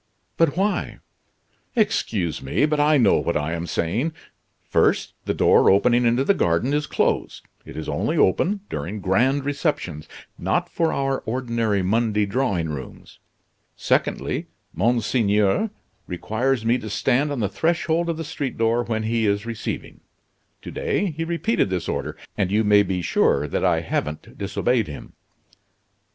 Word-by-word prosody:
"But 165 -1 +2
why?" 200 +2 0 0.8
"Excuse 105 - 0
me, 70 - +1
but 150 -1 0
I 150 +1 +4
know 115 -7 +4
what - - 0
I 75 +2 -2
am 85 +1 -4
saying. 110 - -1 0.5
First, - - +1
the - - 0
door - - +5
opening 120 +5 +4
into 120 +3 +2
the 200 - +3
garden 85 - +1
is 150 0 0
closed; - - -1 0.2
it - - -10
is 80 - -5
only - - -1
open 195 - +2
during 105 +5 -4
grand 130 +9 +1
receptions, 145 - -2 0.3
not - - 0
for 165 -1 0
our 135 -1 0
ordinary 115 -4 0
Monday 105 +1 +1
drawing 100 -7 -1
rooms. 70 -4 -8 0.6
Secondly, - - -1 0.3
Monseigneur 110 - +2 0.4
requires 115 +7 -1
me 120 +2 +2
to 110 - -7
stand 130 +7 +1
on 140 - -2
the 105 - +1
threshold 165 - 0
of 165 - -1
the 165 - -4
street 145 -4 -4
door 115 +1 +2
when 110 -2 -2
he 115 0 +1
is 100 +1 0
receiving. 115 -2 -5 0.6
To - - -7
day 200 -3 -1
he 160 +2 -4
repeated 170 - 0
this 90 -3 -2
order, - - -3 0.2
and 100 -3 0
you 110 +2 +3
may 105 -1 +5
be 95 -3 -2
sure 75 -2 +2
that - - -2
I - - +3
haven't 75 +1 -4
disobeyed 110 +3 0
him." 75 - -9
115 Hz, 155 wpm, -23 LUFS, 100-145 Hz, 0.8 s, door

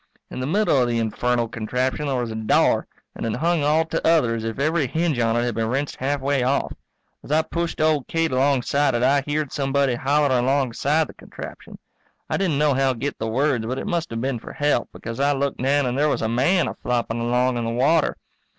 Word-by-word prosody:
In - - -6
the 130 - -2
middle 180 -5 +2
of 125 - +2
the 120 - 0
infernal 120 +1 0
contraption 125 +6 -2
there 135 - 0
was 120 -2 -3
a - - -5
door, 110 -1 +2 0.3
and - - -7
it 115 -2 -1
hung 170 -1 +1
all 155 +2 +3
to 165 0 -3
other 155 -8 +3
as 115 -1 -3
if 115 -1 -4
every 155 +1 +1
hinge 160 -1 0
on 115 0 +2
it 120 - +1
had 120 -1 -1
been 110 +1 -1
wrenched 135 +4 -2
halfway 140 0 0
off. 130 +3 0 0.5
As - - -9
I 155 +1 +3
pushed 170 +1 -3
old 155 -3 +2
Kate 165 -1 0
alongside 135 +1 +2
it 120 - 0
I 140 +2 +4
heared 145 0 -2
somebody 140 -1 +1
hollering 135 0 +2
alongside 140 +3 +1
the - - -12
contraption. - - -10 0.5
I - - +1
didn't 175 -7 0
nohow 135 -3 +2
get 140 +5 -4
the 110 - -2
words 125 -1 0
but 130 +2 -3
it - - -4
must 170 -1 -2
have 115 0 -4
been 130 -2 -2
for - - -10
help, 145 -5 0
because 115 +2 -7
I 140 +1 +3
looked 140 -1 -2
down 140 +2 +2
and 125 0 -1
there 150 +2 +2
was - - -1
a - - +1
man 135 +11 +2
a - - -3
flopping 120 -1 -2
along 125 +1 +1
in - - -2
the - - -1
water. 140 +7 +2
135 Hz, 225 wpm, -23 LUFS, 120-150 Hz, 0.5 s, I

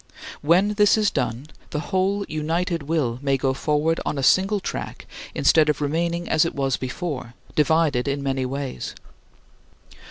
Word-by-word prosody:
When 175 +7 +4
this 210 0 +4
is 210 -2 +2
done 120 +2 -2 0.2
the 150 - -3
whole 195 +2 +1
united 165 +2 -1
will 140 -6 -1
may 135 -1 +1
go 130 0 0
forward 150 +4 0
on - - -2
a 135 - -2
single 195 +8 +4
track - - -5 0.3
instead 155 -2 +4
of 150 - +1
remaining 170 +4 -1
as 155 - +3
it 170 - -2
was 135 -2 +1
before, 130 -2 -5 0.2
divided 150 -4 +2
in 140 0 -1
many 135 -1 -1
ways. 135 - -5
150 Hz, 155 wpm, -23 LUFS, 135-170 Hz, 0.3 s, When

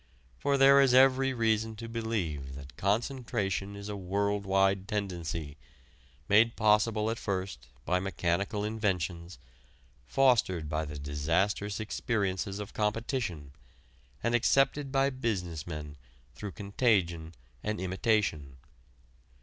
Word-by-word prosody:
For 140 -1 +1
there 140 +1 +7
is 130 -2 +4
every 135 0 +5
reason 110 -2 0
to 115 +2 -7
believe 95 - -3
that 70 -2 -11
concentration 105 - -1
is 100 0 -8
a 105 - -4
world 100 +1 -1
wide 95 0 +2
tendency, 85 -8 -4 0.7
made 115 +3 +4
possible 110 0 +2
at 115 - -4
first 95 - -4 0.2
by 90 +1 +1
mechanical 95 +2 -1
inventions, 90 -6 -2 0.7
fostered 110 - +2
by 80 +1 -2
the 75 0 -7
disastrous 85 +9 -1
experiences 100 -3 -2
of 105 -1 -7
competition, 105 - -2 0.7
and 115 +1 +1
accepted 135 +3 +2
by 135 0 +2
business 90 - -3
men 75 -3 -6 0.4
through 100 +2 -7
contagion 95 -6 0 0.3
and 105 0 -3
imitation. 95 - 0
100 Hz, 115 wpm, -30 LUFS, 85-115 Hz, 0.7 s, there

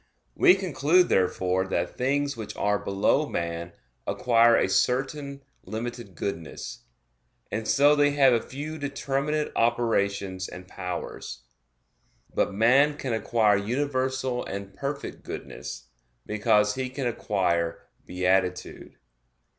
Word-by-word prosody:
We 180 - +6
conclude, 180 -1 +2
therefore, 95 0 +1
that 90 -2 -2
things 140 +2 0
which 110 -3 -7
are 105 0 +1
below 105 +9 +1
man 85 0 -3 0.3
acquire 115 -1 +4
a - - +2
certain 140 +2 0 0.2
limited 115 -3 -6
goodness; 80 -3 -6 0.7
and 110 +1 -3
so 145 +1 +5
they 145 -1 +4
have 140 -3 +5
a 115 - +2
few 150 +4 -6
determinate 140 +1 -1
operations 100 -5 0
and 90 +1 -10
powers. 90 -9 -6 0.9
But - - +1
man 130 +8 +4
can 130 -5 -3
acquire 110 -2 +2
universal 130 +2 -1
and 100 0 -6
perfect 140 +4 -5
goodness, - - -8 0.4
because 105 0 +2
he 130 +1 -3
can 130 +1 -4
acquire 90 -7 0 0.2
beatitude. 90 0 -1
115 Hz, 115 wpm, -26 LUFS, 95-140 Hz, 0.9 s, We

